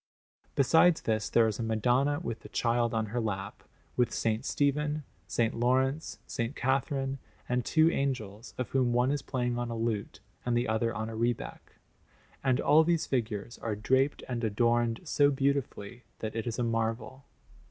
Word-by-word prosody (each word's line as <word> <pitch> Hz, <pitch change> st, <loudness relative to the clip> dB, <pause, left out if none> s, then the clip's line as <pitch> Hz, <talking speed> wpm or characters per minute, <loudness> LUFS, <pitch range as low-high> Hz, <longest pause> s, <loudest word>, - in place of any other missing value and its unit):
Besides 160 Hz, +5 st, +5 dB
this, 110 Hz, -2 st, -1 dB
there 115 Hz, -, +4 dB
is 110 Hz, 0 st, -3 dB
a -, -, -1 dB
Madonna 120 Hz, +6 st, +1 dB
with 115 Hz, -9 st, -4 dB
the -, -, -12 dB
Child 120 Hz, 0 st, +1 dB
on 110 Hz, -1 st, 0 dB
her 120 Hz, -, 0 dB
lap, 100 Hz, -3 st, -4 dB, 0.3 s
with 120 Hz, -1 st, +2 dB
S. 115 Hz, +3 st, -1 dB
Stephen, 150 Hz, +1 st, 0 dB, 0.3 s
S. 115 Hz, 0 st, +1 dB
Laurence, 130 Hz, +5 st, +1 dB
S. 115 Hz, -1 st, -2 dB
Catherine, 135 Hz, +1 st, 0 dB, 0.3 s
and 125 Hz, 0 st, 0 dB
two 160 Hz, +6 st, +4 dB
angels, 115 Hz, -7 st, -3 dB
of 125 Hz, -4 st, -3 dB
whom 125 Hz, -3 st, +2 dB
one 125 Hz, +2 st, +3 dB
is 145 Hz, -1 st, -1 dB
playing 125 Hz, -3 st, -2 dB
on 120 Hz, 0 st, -2 dB
a 115 Hz, -, -4 dB
lute 110 Hz, -3 st, -2 dB, 0.2 s
and 120 Hz, -1 st, +1 dB
the 120 Hz, +1 st, +1 dB
other 110 Hz, +1 st, +1 dB
on 110 Hz, -1 st, -3 dB
a 115 Hz, -, -6 dB
rebec; 120 Hz, +1 st, -3 dB, 0.7 s
and 130 Hz, -2 st, +2 dB
all 155 Hz, +2 st, +5 dB
these 170 Hz, 0 st, +1 dB
figures 115 Hz, -3 st, -3 dB
are 110 Hz, -2 st, -2 dB
draped 130 Hz, +7 st, +1 dB
and 120 Hz, -2 st, -3 dB
adorned 115 Hz, +2 st, +1 dB
so 145 Hz, -3 st, +3 dB
beautifully 135 Hz, -5 st, -1 dB, 0.2 s
that 110 Hz, 0 st, -5 dB
it 115 Hz, +1 st, -3 dB
is 115 Hz, -, -2 dB
a 125 Hz, -, 0 dB
marvel. 115 Hz, +3 st, -2 dB
120 Hz, 175 wpm, -30 LUFS, 115-135 Hz, 0.7 s, Besides